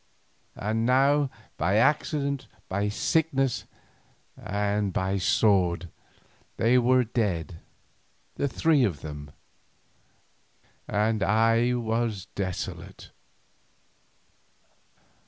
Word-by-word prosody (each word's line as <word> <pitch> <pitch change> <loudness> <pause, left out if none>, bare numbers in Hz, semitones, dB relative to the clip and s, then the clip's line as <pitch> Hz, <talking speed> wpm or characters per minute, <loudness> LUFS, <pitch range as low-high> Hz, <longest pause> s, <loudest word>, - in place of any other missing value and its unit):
And 110 +2 -1
now 135 +3 +3 0.3
by 95 - +1
accident, 140 +2 +1 0.2
by 100 +2 -1
sickness, 135 +2 0 0.7
and 100 0 -1
by 95 +1 -1
the 100 - 0
sword, 90 -3 +2 0.7
they 120 +3 +4
were 125 +1 +4
dead 90 -9 -2 0.7
the 140 - -1
three 150 0 +2
of 90 - -1
them, 75 -1 -8 1.6
and 105 +1 0
I 115 +4 +3
was 115 -4 -1
desolate. 95 -3 -5
110 Hz, 80 wpm, -26 LUFS, 95-125 Hz, 1.6 s, they